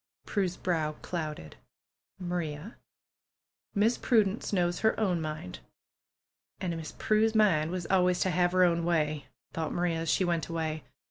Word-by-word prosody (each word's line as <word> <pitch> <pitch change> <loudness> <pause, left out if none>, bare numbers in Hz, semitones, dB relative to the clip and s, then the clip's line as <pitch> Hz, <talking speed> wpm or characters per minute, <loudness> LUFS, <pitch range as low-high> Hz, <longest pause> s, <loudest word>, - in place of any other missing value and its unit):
Prue's 190 -4 -1
brow 160 -4 0
clouded. 155 - -5 0.6
Maria, 175 0 -4 1.0
Miss 220 +4 +3
Prudence 215 -3 +2
knows 175 -3 +1
her 220 - +2
own 185 -6 +1
mind." 155 - -5 1.0
^^And 180 -3 -2
Miss 160 -1 -7
Prue's 220 +1 +2
mind 170 -8 +4
was 180 -1 -3
always 180 -1 +3
to 185 - +2
have 175 0 +2
her 185 0 +5
own 170 -1 +3
way," 155 -4 0 0.3
thought 160 -2 -2
Maria, 175 -2 0
as 165 -1 -2
she 185 - +3
went 170 -2 0
away. 160 -2 -2
175 Hz, 145 wpm, -29 LUFS, 160-185 Hz, 1.0 s, her